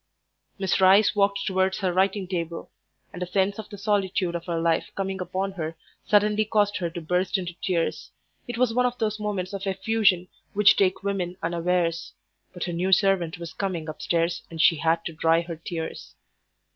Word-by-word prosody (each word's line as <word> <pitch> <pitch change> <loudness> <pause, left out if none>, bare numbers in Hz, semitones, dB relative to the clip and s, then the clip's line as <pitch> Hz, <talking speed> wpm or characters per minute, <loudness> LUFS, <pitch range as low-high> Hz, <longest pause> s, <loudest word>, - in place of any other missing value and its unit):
Miss 190 -1 0
Rice 195 +3 +6
walked 200 -1 +2
towards 190 -1 +1
her 185 -2 -1
writing 190 +1 +1
table, 170 -2 -4 0.4
and 180 - -8
a 180 - -2
sense 195 +3 0
of 215 - -7
the 205 - -9
solitude 195 -3 0
of 170 0 -5
her 170 -1 -1
life 165 0 +1
coming 195 -1 -3
upon 190 +2 -2
her 165 -3 -5 0.3
suddenly 210 +1 +3
caused 205 -1 +1
her 175 -2 -2
to 170 - -6
burst 180 +5 0
into 180 -2 -4
tears. 175 -4 -1 0.4
It 240 -1 -5
was 245 -2 +2
one 250 +1 +3
of 245 0 -4
those 215 -1 -1
moments 200 -3 -3
of 195 0 -4
effusion 190 -2 +2 0.3
which 210 -1 +6
take 190 -1 +1
women 185 -3 -2
unawares. 170 -1 0 0.4
But 180 - -6
her 175 - -3
new 180 +3 -1
servant 190 -3 +3
was 170 -1 -8
coming 180 -5 -3
upstairs 165 +2 -1
and 165 - -9
she 160 +1 +5
had 165 +2 +1
to 165 - -4
dry 165 +1 +3
her 170 -2 -8
eyes. 165 -1 -6
185 Hz, 185 wpm, -25 LUFS, 170-200 Hz, 0.4 s, Rice